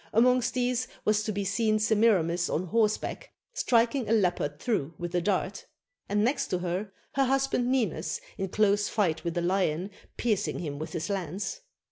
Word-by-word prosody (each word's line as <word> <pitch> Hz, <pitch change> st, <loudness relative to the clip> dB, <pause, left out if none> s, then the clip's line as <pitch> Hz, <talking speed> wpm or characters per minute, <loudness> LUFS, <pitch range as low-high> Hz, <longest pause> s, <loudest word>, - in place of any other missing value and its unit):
Amongst 250 Hz, +2 st, +3 dB
these 250 Hz, 0 st, 0 dB, 0.2 s
was 215 Hz, 0 st, +3 dB
to 215 Hz, -, -1 dB
be 200 Hz, -1 st, -2 dB
seen 215 Hz, +3 st, +2 dB
Semiramis 205 Hz, -6 st, +2 dB
on 175 Hz, -, -1 dB
horseback, 215 Hz, +3 st, 0 dB, 0.2 s
striking 235 Hz, -, +2 dB
a -, -, +3 dB
leopard 175 Hz, -8 st, +1 dB
through 165 Hz, -, -1 dB
with 175 Hz, 0 st, -5 dB
a 175 Hz, -, +2 dB
dart; 190 Hz, +2 st, -1 dB, 0.4 s
and 205 Hz, +1 st, +2 dB
next 255 Hz, +4 st, +1 dB
to 180 Hz, -, 0 dB
her, 180 Hz, +3 st, -3 dB, 0.2 s
her 270 Hz, 0 st, +3 dB
husband 265 Hz, -2 st, +1 dB
Ninus 210 Hz, -11 st, 0 dB, 0.2 s
in 195 Hz, -, -2 dB
close 205 Hz, +1 st, +2 dB
fight 175 Hz, -7 st, 0 dB
with 170 Hz, -1 st, -3 dB
a -, -, +2 dB
lion, 180 Hz, 0 st, 0 dB, 0.3 s
piercing 220 Hz, -5 st, 0 dB
him 145 Hz, -4 st, -4 dB
with 155 Hz, +1 st, -6 dB
his 165 Hz, -3 st, -2 dB
lance. 195 Hz, -, -3 dB
205 Hz, 170 wpm, -28 LUFS, 175-230 Hz, 0.4 s, Amongst